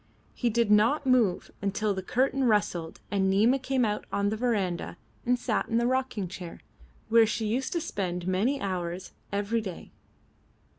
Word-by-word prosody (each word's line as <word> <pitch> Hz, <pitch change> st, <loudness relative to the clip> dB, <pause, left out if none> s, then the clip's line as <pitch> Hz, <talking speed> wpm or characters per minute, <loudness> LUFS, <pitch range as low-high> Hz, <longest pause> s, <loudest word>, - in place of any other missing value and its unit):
He 240 Hz, -, 0 dB
did 230 Hz, -1 st, +1 dB
not 230 Hz, +8 st, +4 dB
move 240 Hz, -8 st, +2 dB, 0.2 s
till 210 Hz, 0 st, 0 dB
the 190 Hz, -, -3 dB
curtain 265 Hz, +6 st, +1 dB
rustled 190 Hz, -7 st, 0 dB
and 195 Hz, -1 st, +2 dB
Nina 220 Hz, +8 st, +4 dB
came 260 Hz, -1 st, +1 dB
out 210 Hz, -1 st, -2 dB
on 200 Hz, 0 st, +1 dB
the 215 Hz, -, -1 dB
verandah 210 Hz, -7 st, -1 dB, 0.3 s
and 250 Hz, 0 st, +3 dB
sat -, -, -1 dB
in 230 Hz, -, +1 dB
the 235 Hz, -, +2 dB
rocking 255 Hz, -6 st, 0 dB
chair, 175 Hz, -1 st, -8 dB, 0.5 s
where 230 Hz, 0 st, +6 dB
she 220 Hz, +1 st, -2 dB
used 245 Hz, +5 st, -1 dB
to 340 Hz, -, 0 dB
spend 180 Hz, -, -3 dB
many 215 Hz, +10 st, +1 dB
hours 180 Hz, -3 st, -3 dB, 0.2 s
every 205 Hz, +3 st, 0 dB
day. 190 Hz, -5 st, -8 dB
215 Hz, 165 wpm, -28 LUFS, 190-245 Hz, 0.5 s, where